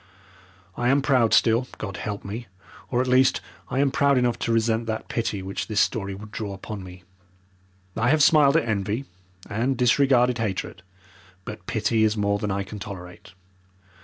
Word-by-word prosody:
I 120 0 +1
am 135 +1 +3
proud 130 -6 +3
still 115 +2 +3
God 100 -4 -6
help 100 +2 -5
me! 110 +4 -6 0.4
or, 125 -1 +1
at 130 - -2
least, 130 +1 +4 0.3
I 130 - -3
am 140 0 +3
proud 140 0 +3
enough 125 -1 +1
to 115 - -1
resent 115 0 +1
that 110 -1 -4
pity 110 -4 -2
which 95 +2 -4
this 105 -2 0
story 100 -5 0
would 105 +2 -11
draw 105 -2 -5
upon 100 0 -7
me. 90 0 -12 0.9
I 115 +2 +1
have 155 0 +4
smiled 150 -1 +5
at 160 - 0
envy, 105 +4 -1 0.4
and 120 +5 -1
disregarded 125 -1 +3
hatred, 105 -7 -3 0.6
but 105 - -8
pity 110 0 +1
is 110 0 +2
more 100 0 +1
than 105 - -2
I 100 0 -1
can 105 +2 -9
tolerate. 90 -3 -9
115 Hz, 175 wpm, -24 LUFS, 100-125 Hz, 0.9 s, smiled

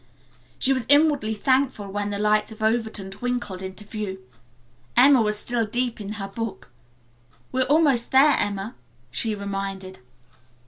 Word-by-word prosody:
She 270 - +2
was 255 -4 -3
inwardly 285 -7 +4
thankful 260 -2 +1
when 205 0 -2
the 205 - -3
lights 210 +1 +1
of 220 0 -8
Overton 220 -3 -1
twinkled 210 -3 -4
into 190 +2 -7
view. 205 -2 -5 0.8
Emma 265 0 +7
was 210 -1 +1
still 240 +2 0
deep 240 0 -2
in 205 +1 -5
her 200 -2 -5
book. 195 - -6 0.8
"We 260 - 0
are - - +3
almost 280 -4 +3
there, 275 +2 +6
Emma," 205 +2 -2 0.4
she 220 -2 -1
reminded. 195 -1 -5
215 Hz, 145 wpm, -24 LUFS, 200-250 Hz, 0.8 s, Emma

